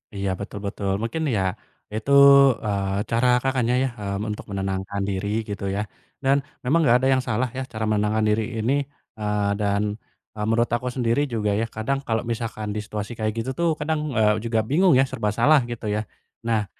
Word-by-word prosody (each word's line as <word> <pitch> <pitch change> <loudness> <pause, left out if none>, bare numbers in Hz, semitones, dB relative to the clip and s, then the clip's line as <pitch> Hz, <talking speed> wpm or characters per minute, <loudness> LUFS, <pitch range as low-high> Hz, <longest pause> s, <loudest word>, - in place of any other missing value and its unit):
Iya 100 -1 -2
betul 100 0 -6
betul. 100 -1 -2
Mungkin 160 +8 -2
ya 95 - +1 0.5
itu, 110 +6 -3 0.5
eee, 100 -1 -1
cara 115 +2 +2 0.2
Kakaknya 130 -3 +1
ya, 135 - +1
mmm, 100 +1 -3
untuk 105 - -5
menenangkan 95 0 -3
diri 95 +1 -2 0.2
gitu 100 -1 -5
ya 105 - 0 0.4
dan 135 +1 +4 0.3
memang 150 +7 +3
enggak 125 -4 +5
ada 130 - +1
yang 130 -1 +1
salah 120 +3 0
ya - - -1
cara 110 -1 -3
menenangkan 105 +1 +1
diri 110 +1 +2 0.2
ini, 120 +5 +1 0.4
eee, 105 -1 0
dan, 100 0 +1 0.5
eee, 105 0 -3
menurut 115 +1 +2
aku 125 +1 -3
sendiri 120 +2 +1
juga 105 -2 0
ya, 115 - 0
kadang 135 +6 -1
kalau 115 -1 +1
misalkan 110 -2 -4
di 105 - -1
situasi 105 0 -5
kayak 110 -1 0
gitu 130 - -5
tuh, 170 - +3
kadang, 155 +1 -1 0.2
eee, 105 -1 +4
juga 115 -1 +1
bingung 175 +3 +4
ya, 135 - +5
serba 105 -5 -1
salah 145 +5 +6
gitu 115 -2 -6
ya. 105 - 0 0.4
Nah 110 -3 +1
110 Hz, 190 wpm, -24 LUFS, 105-125 Hz, 0.5 s, salah